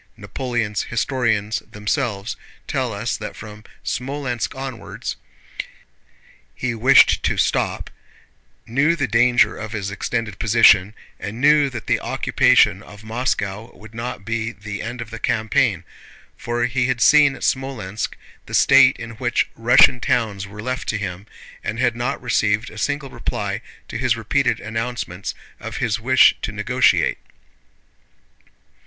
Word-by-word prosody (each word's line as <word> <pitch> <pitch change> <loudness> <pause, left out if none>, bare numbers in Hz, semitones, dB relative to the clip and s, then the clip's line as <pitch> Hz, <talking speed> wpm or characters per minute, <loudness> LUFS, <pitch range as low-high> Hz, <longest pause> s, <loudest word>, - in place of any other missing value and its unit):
Napoleon's 120 -6 -3
historians 115 -3 0
themselves 105 0 -3 0.3
tell 130 -4 -1
us 105 +3 -2
that 105 - -7
from 105 0 -11 0.2
Smolénsk 130 -2 -3
onwards 130 -3 -6 1.4
he 125 -2 -2
wished 130 +4 +5
to - - 0
stop, - - 0 0.7
knew 145 +8 +2
the 145 -5 -1
danger 120 +2 +3
of 110 +1 -6
his 100 -2 -3
extended 105 0 -3
position, 110 -2 +5 0.2
and 110 +3 -6
knew 145 +1 +5
that 120 -4 -7
the - - +1
occupation 95 - +3
of 105 0 -14
Moscow 110 -2 -2
would 110 +1 -14
not 115 -3 -6
be 115 0 -2
the 100 0 -7
end 120 +1 -5
of 115 -1 -8
the 115 - -7
campaign, 110 -4 +1 0.5
for 120 0 -2
he 125 +1 0
had 130 -2 -1
seen 145 +2 +5
at - - -10
Smolénsk 120 -7 -2 0.3
the - - -3
state - - +6
in 115 0 -7
which 120 -2 0
Russian 125 +2 +5
towns 105 -5 -1
were 105 +2 -9
left 130 +1 -3
to 110 - 0
him, 100 0 -6 0.4
and 110 - -3
had 120 -1 +1
not 120 +4 -2
received 110 -2 0
a 110 - -12
single 145 0 -2
reply 105 -4 -3 0.3
to - - -5
his 125 -2 +1
repeated 120 +1 0
announcements 110 -4 -4 0.2
of - - -6
his 110 -2 -1
wish 130 +3 +5
to - - -3
negotiate. - - +2
115 Hz, 140 wpm, -21 LUFS, 105-125 Hz, 1.4 s, state